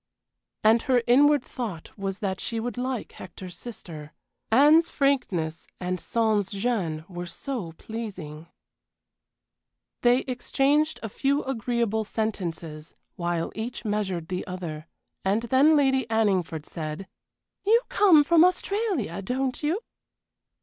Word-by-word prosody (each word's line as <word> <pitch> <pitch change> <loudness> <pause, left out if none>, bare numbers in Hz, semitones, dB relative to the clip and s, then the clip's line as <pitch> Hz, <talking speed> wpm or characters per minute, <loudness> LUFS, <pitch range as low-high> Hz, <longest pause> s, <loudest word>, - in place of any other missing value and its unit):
And 225 +2 +5
her 250 -3 +2
inward 285 +3 +5
thought 210 -10 -6
was 195 -2 -3
that 195 -4 -2
she 230 - -2
would 235 -1 -3
like 250 -2 -3
Hector's 185 -1 -10
sister. 165 -11 -9 0.4
Anne's 300 +7 +6
frankness 190 - 0
and 180 0 -2
sans 215 -1 +1
gêne 195 -7 -2
were 175 -1 -6
so 200 - -5
pleasing. 180 -7 -7 1.5
They 245 +1 +4
exchanged 275 +4 +1
a 225 - -3
few 280 +7 0
agreeable 235 -3 -1
sentences 170 -8 -4 0.2
while 170 -2 -2
each 230 +2 -5
measured 190 -6 -2
the 180 0 -3
other, 170 -4 -6 0.4
and 200 +4 +1
then 265 +6 +5
Lady 265 -3 +3
Anningford 190 -8 +1
said: 155 +3 -6 0.6
"You 450 +4 +5
come 360 -8 +6
from 330 +2 +5
Australia, 365 - 0
don't 255 +5 -2
you?" 320 +8 0
220 Hz, 120 wpm, -26 LUFS, 180-265 Hz, 1.5 s, Anne's